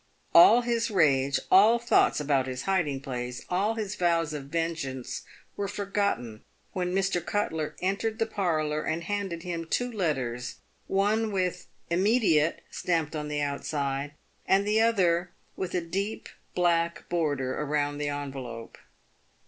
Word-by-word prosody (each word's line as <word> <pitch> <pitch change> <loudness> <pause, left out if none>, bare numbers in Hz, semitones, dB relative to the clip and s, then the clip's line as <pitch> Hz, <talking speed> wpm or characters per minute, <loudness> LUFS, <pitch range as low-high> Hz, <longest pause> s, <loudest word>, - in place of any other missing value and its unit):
All 220 +8 +8
his 235 -1 0
rage, 140 -8 +3
all 215 +5 +7
thoughts 235 -8 +3
about 140 -3 +1
his 130 0 -4
hiding 170 -9 0
place, 125 -2 -5
all 200 +5 +1
his 210 -3 -3
vows 170 -4 +1
of 145 -2 -5
vengeance 145 -5 -3 0.3
were 200 - -2
forgotten 200 - -2 0.3
when 180 -1 -1
Mr. 190 -3 +1
Cutler 160 -7 -2
entered 200 +4 0
the 225 - +1
parlour 155 -8 -1
and 160 +2 -2
handed 190 -3 -3
him 170 -2 -4
two 245 +8 0
letters; 130 - -2 0.3
one 210 +3 +1
with 185 -2 -1
" - - -38
Immediate" 180 -4 +3 0.5
on 150 -1 -3
the 150 0 -2
outside, 140 0 -2 0.3
and 195 +1 +3
the 215 +1 +3
other 180 -6 +2 0.2
with 185 -1 -4
a 180 - +1
deep 195 +6 -4 0.3
black 170 -1 +1
border 145 -5 -1
round 145 0 -1
the 145 - -1
envelope. 135 -5 -6
170 Hz, 140 wpm, -28 LUFS, 145-200 Hz, 0.5 s, All